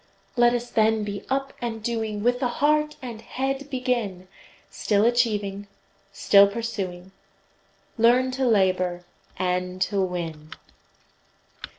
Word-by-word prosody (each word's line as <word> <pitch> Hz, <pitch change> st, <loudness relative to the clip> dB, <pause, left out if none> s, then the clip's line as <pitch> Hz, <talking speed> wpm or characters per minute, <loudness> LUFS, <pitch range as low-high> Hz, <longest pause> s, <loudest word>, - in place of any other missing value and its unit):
Let 240 Hz, 0 st, +4 dB
us 240 Hz, 0 st, -4 dB
then 220 Hz, 0 st, +2 dB
be 205 Hz, -1 st, -5 dB
up 270 Hz, 0 st, -1 dB
and 225 Hz, -2 st, -4 dB
doing, 220 Hz, -3 st, -2 dB
With 245 Hz, +1 st, +2 dB
the 255 Hz, -, +1 dB
heart 300 Hz, +4 st, +1 dB
and 235 Hz, -3 st, -7 dB
head 270 Hz, +4 st, -3 dB
begin; 240 Hz, -9 st, -2 dB, 0.4 s
Still 205 Hz, 0 st, +1 dB
achieving, 210 Hz, -4 st, 0 dB, 0.4 s
still 200 Hz, 0 st, +5 dB
pursuing, 195 Hz, -4 st, -5 dB, 0.9 s
Learn 245 Hz, +3 st, +4 dB
to 260 Hz, 0 st, 0 dB
labor, 185 Hz, -4 st, +1 dB, 0.3 s
and 180 Hz, 0 st, -2 dB
to 195 Hz, +1 st, -1 dB
win! 165 Hz, -4 st, -4 dB
220 Hz, 115 wpm, -24 LUFS, 190-245 Hz, 0.9 s, still